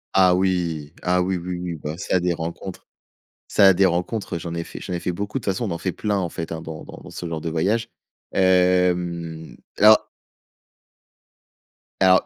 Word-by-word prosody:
Ah 95 -2 +6
oui, 85 -5 0
ah 90 0 +2
oui, 95 0 0
oui, 90 +1 -4
oui, 90 -1 -4
bah 75 0 -6
ça, 95 0 0
des 90 0 +1
rencontres 85 +3 -6 0.6
ça, 95 -1 +6
des 95 +2 +4
rencontres, 90 +3 -2
j'en 85 0 -5
ai 85 0 -2
fait - - -9
j'en - - -6
ai 90 - -1
fait 90 - -2
beaucoup 100 +7 -3
de - - -16
toute 100 - +2
façon, 105 +6 -2
on 100 - -3
en - - -3
fait 95 0 -2
plein, 105 +2 -1
en 90 - -1
fait, 85 -1 -6
hein 80 -1 -4
dans 80 -1 -7
dans - - -11
dans - - -11
ce - - -7
genre 80 -1 -3
de 80 - -3
voyage, 100 +8 0 0.5
hem, 90 -3 +2 0.2
alors 110 +1 +7 1.9
alors 95 -1 +5
90 Hz, 195 wpm, -23 LUFS, 85-95 Hz, 1.9 s, alors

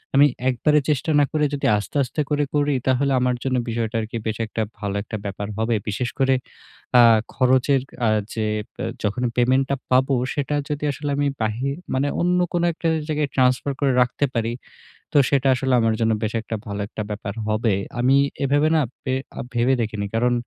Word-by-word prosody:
আমি 140 +1 +7 0.2
একবারে 150 +4 +3
চেষ্টা 150 +2 +1
না 145 - +5
করে 150 -1 +1
যদি 140 - -2
আস্তে, 105 - -6
আস্তে 130 +4 -3
করে 145 0 +2
করি 145 0 +2 0.2
তাহলে 135 +2 +2
আমার 125 0 +1
জন্য 130 -1 0
বিষয়টা 115 0 -2
আরকি 110 +1 -5
বেশ 110 0 -2
একটা 110 - -3 0.2
ভালো 100 -1 -3
একটা 110 - -5
ব্যাপার 100 +1 -4
হবে। 110 +1 +1
বিশেষ 115 +4 -2
করে 135 -1 +4 0.6
আ - - +9 0.3
খরচের 130 +1 +3 0.3
আ - - +4 0.2
যে 110 -1 -1 0.3
বে - - -5 0.2
যখনই 120 +4 0
পেমেন্টটা 130 +3 +2 0.2
পাবো, 130 +2 +3 0.2
সেটা 145 0 -1
যদি 150 0 -3
আসলে 145 +1 -4
আমি 145 0 +1 0.2
বাহির 120 +6 -1 0.2
মানে 135 +2 +1
অন্য 180 +1 +2
কোনো 175 0 +1
একটা 165 - -3 0.2
জায়গায় 150 -1 0
ট্রান্সফার 130 +2 +2
করে 140 -1 +3
রাখতে 125 +3 +1
পারি, 115 0 0 0.6
তো - - +4
সেটা 140 -1 +2
আসলে 130 0 0
আমার 115 0 +2
জন্য 115 0 +3
বেশ 110 - -1
একটা 110 0 -5
ভালো 100 0 -4
একটা 110 - -6
ব্যাপার 105 -1 -5
হবে। 110 0 +1 0.3
আমি 130 +2 +4 0.3
এভাবে 145 +2 +3
না 155 - +4 0.2
পে 130 - -1 0.3
আ - - -1
ভেবে 120 +2 +2
দেখিনি। 105 -2 -2
কারণ 120 +2 +2
130 Hz, 190 wpm, -22 LUFS, 115-140 Hz, 0.6 s, আ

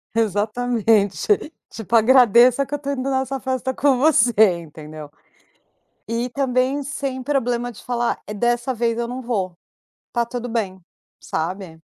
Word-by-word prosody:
Exatamente. 220 -1 +1 0.4
Tipo 225 +1 -3
agradeça 245 +2 +5
que 270 - -10
eu - - 0
estou 280 -1 -4
indo 265 0 -3
nessa 265 0 -1
festa 260 0 -2
com 265 -1 +2
você, 255 -5 +4 0.3
entendeu? 155 -1 -11 1.0
E 235 +2 -1
também 265 +1 0
sem 270 -1 -4
problema 245 -3 -1
de 235 - -12
falar, 240 -1 -1
é 210 - -6
dessa 240 +4 0
vez 230 -1 -1
eu 235 0 -2
não 255 +1 -5
vou, 195 -8 -3 0.5
está 235 -1 0
tudo 245 +1 -6
bem, 205 -5 -3 0.4
sabe. 165 0 -5
240 Hz, 140 wpm, -21 LUFS, 215-260 Hz, 1.0 s, agradeça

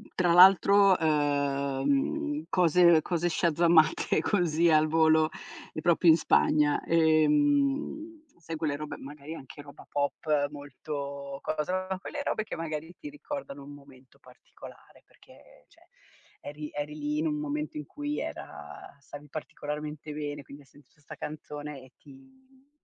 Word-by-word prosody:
tra 175 -2 +2
l'altro, 195 +2 +7
ehm, 150 - 0
cose 170 -2 +5
cose 175 +1 -1
shazzamate 165 -2 +3
così 170 -3 +2
al 155 -1 +4
volo 160 0 +3 0.5
proprio 170 +1 +3
in 160 - +7
Spagna. 150 -2 +2
Ehm, 285 - +1
sai 165 -1 -7
quelle 155 -2 -1
robe 150 +1 -6
magari 145 +2 -9
anche 135 0 -11
roba 145 0 -14
pop 145 0 -1
molto 140 -1 -7
cosa 180 +5 -2
quelle 285 +8 -6
robe 215 - -1
che 215 - -7
magari 160 0 -5
ti 300 - -8
ricordano 280 - -7
un 140 - -11
momento 135 -3 -18
particolare, - - -16
perché - - -21
cioè - - -25 0.5
eri 150 +1 -8
eri 145 +1 -5
lì 295 +1 -2
in 320 - 0
un 300 - -1
momento 300 +1 -4
in 300 - -6
cui 295 0 -4
era - - -8
stavi 145 +1 -12
particolarmente 150 0 -6
bene, 145 -1 -5
quindi 140 +2 -13
hai - - -26
sentito 145 +1 -23
sta 145 - -11
canzone 150 -1 -7
e 130 0 -17
ti 265 0 -20
155 Hz, 135 wpm, -28 LUFS, 145-200 Hz, 0.5 s, l'altro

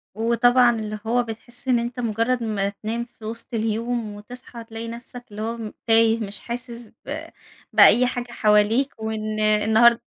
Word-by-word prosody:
وطبعًا 240 +2 +4
اللي 215 -1 -5
هو 245 +2 +2
بتحس 240 +3 -10
إن 245 -2 +3
أنت 235 +1 -4
مجرّد 230 +2 0
ما 200 -3 -1
تنام 220 +4 -4
في 220 - -10
وسط 230 +2 -7
اليوم 225 0 -2
وتصحى 235 +2 -10
تلاقي 225 0 -7
نفسك 240 +1 -9
اللي 210 - -7
هو 230 +2 -3
م 220 -2 -7
تايه، 225 0 +4
مش 205 -2 -5
حاسس 235 -1 -7
ب - - -5 0.5
بأي 250 +1 +7
حاجة 245 -1 -4
حواليك، 215 +5 +3
وإن 215 -1 -3
النهارد 220 +2 +4
230 Hz, 160 wpm, -23 LUFS, 215-240 Hz, 0.5 s, بأي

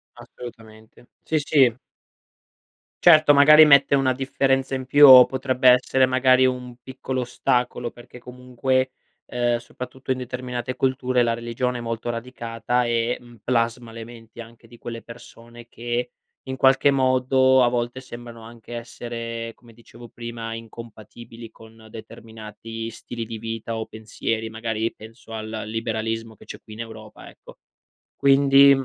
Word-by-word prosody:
Assolutamente. 110 -2 -13 0.2
Sì, 160 - -1
sì. 135 -5 +2 1.2
Certo, 155 -1 +7
magari 150 +2 +8
mette 140 -2 +5
una 135 -1 +2
differenza 135 0 -1
in 130 -1 -5
più 145 +2 +7
o 130 -1 +10
potrebbe 130 -1 +1
essere 125 +1 +4
magari 130 0 +3
un 125 -1 -3
piccolo 130 0 -5
ostacolo, 125 -1 -1
perché 120 +1 -14
comunque, 125 +1 -2 0.4
ehm, 120 -1 0
soprattutto 125 +2 -8
in 130 - 0
determinate 125 0 -5
culture, 130 -2 0
la 115 -1 0
religione 120 +2 -3
è - - -6
molto 115 0 -4
radicata 120 0 -3
e, 120 0 -1
mhmm, 120 -1 -17
plasma 115 -1 -1
le 115 0 -8
menti 115 0 -12
anche 115 0 -15
di 120 +1 -16
quelle 115 0 -8
persone 120 0 -14
che, 120 +1 -4 0.4
in 130 - -4
qualche 135 +1 +4
modo 130 0 +3
a 120 - +3
volte 120 +1 -3
sembrano 120 -2 -11
anche 115 +1 -12
essere, 115 -1 -6
come 120 -1 -19
dicevo 115 +1 -15
prima, 115 -1 -7
incompatibili 115 0 -11
con 110 0 -17
determinati 115 +1 -9
stili 115 0 -8
di 110 0 -7
vita 115 +1 -5
o 110 - -4
pensieri, 110 0 -5
magari 110 0 -3
penso 115 +1 -15
al 110 -1 -6 0.2
liberalismo 115 0 -4
che - - -17
c'è - - -10
qui 110 - -14
in 110 - -7
Europa, 110 -2 -11
ecco. - - -17 0.6
Quindi, 140 0 +5
120 Hz, 145 wpm, -23 LUFS, 115-130 Hz, 1.2 s, o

